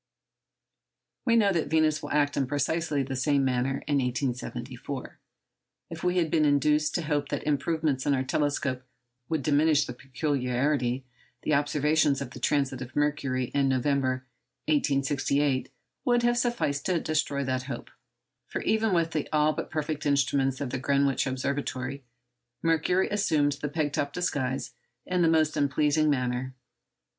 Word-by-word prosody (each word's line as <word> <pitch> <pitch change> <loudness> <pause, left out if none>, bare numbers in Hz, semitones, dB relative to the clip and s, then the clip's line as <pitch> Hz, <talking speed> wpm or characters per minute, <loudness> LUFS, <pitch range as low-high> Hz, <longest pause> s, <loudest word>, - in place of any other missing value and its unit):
We 230 -2 +4
know 205 -4 +4
that 165 -3 0
Venus 155 0 +2
will 145 - -6
act 145 -1 +1
in 135 -2 0
precisely 145 +1 0
the 135 0 -4
same 135 +1 +2
manner 130 +1 0
in 145 -1 +1
1874. 125 +1 -4 0.7
If 165 - -7
we 180 0 +1
had 165 -3 +1
been 155 - +3
induced 150 +1 +2
to 175 - 0
hope 145 -2 -1
that - - -3
improvements 150 -1 0
in 140 - +4
our 130 - 0
telescopes 140 -2 -1 0.5
would 160 -4 -1
diminish 150 +1 +3
the 125 - -6
peculiarity, 130 -1 -1 0.4
the 155 - +1
observations 145 0 +2
of 135 -3 -6
the - - -9
transit 135 -3 0
of 125 +1 -8
Mercury, 140 -4 0
in 140 -1 +2
November 130 -1 0 0.4
1868, 140 -2 +1 0.3
would 240 -1 +2
have 240 0 +3
sufficed 240 - 0
to 180 -3 +2
destroy 150 -3 -1
that 130 -1 -1
hope, - - -6 0.6
for - - -4
even 220 -2 +2
with 165 -1 +1
the 155 -3 -2
all 155 0 +3
but - - -5
perfect 155 -1 -2
instruments 135 -1 +1
of 140 -4 -3
the 130 - -2
Greenwich 140 0 +1
Observatory, 135 0 -3 0.6
Mercury 165 +3 +2
assumed 155 -8 +2
the 150 - -2
peg 145 -1 -1
top 140 0 -1
disguise 135 -7 -2 0.3
in 180 -1 0
the 165 - +4
most 160 -1 +3
unpleasing 150 +1 +2
manner. 130 -1 -1
145 Hz, 150 wpm, -27 LUFS, 130-155 Hz, 0.7 s, We